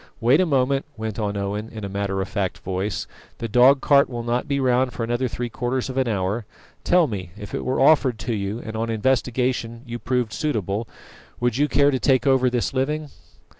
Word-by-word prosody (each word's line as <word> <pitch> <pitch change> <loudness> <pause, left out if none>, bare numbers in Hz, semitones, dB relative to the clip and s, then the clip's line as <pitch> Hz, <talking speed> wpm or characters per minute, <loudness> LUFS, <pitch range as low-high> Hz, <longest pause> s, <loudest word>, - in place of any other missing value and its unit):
"Wait 130 +9 +4
a 185 - +2
moment," 135 -1 +2
went 110 0 -4
on 100 -1 -1
Owen, 100 +2 -3
in 110 -3 -7
a - - -3
matter 100 0 -2
of - - -7
fact 100 -4 -2
voice, 95 +2 -3 0.3
"the 115 - -4
dog 125 +5 +5
cart 140 -1 +4
will 120 -2 -4
not 120 +1 -1
be 140 0 0
round 130 -1 +2
for 120 - -4
another 120 +3 0
three 120 +1 -4
quarters 125 +2 -2
of 130 - -7
an 130 - +1
hour. 100 +1 -1 0.4
Tell 175 -1 +4
me, 100 - -5
if 105 -1 -9
it - - -2
were 130 - -1
offered 135 -4 +4
to 120 - -2
you, 100 0 -2
and 110 0 -6
on 115 +1 -2
investigation 120 0 0
you 120 -1 -6
proved 120 -3 -1
suitable, 110 - -2 0.5
would 120 -1 0
you 145 +1 +3
care 145 -1 +4
to 130 - 0
take 135 0 +2
over 130 -2 +4
this 120 +1 -1
living?" 150 +3 -1
120 Hz, 210 wpm, -23 LUFS, 110-130 Hz, 0.5 s, dog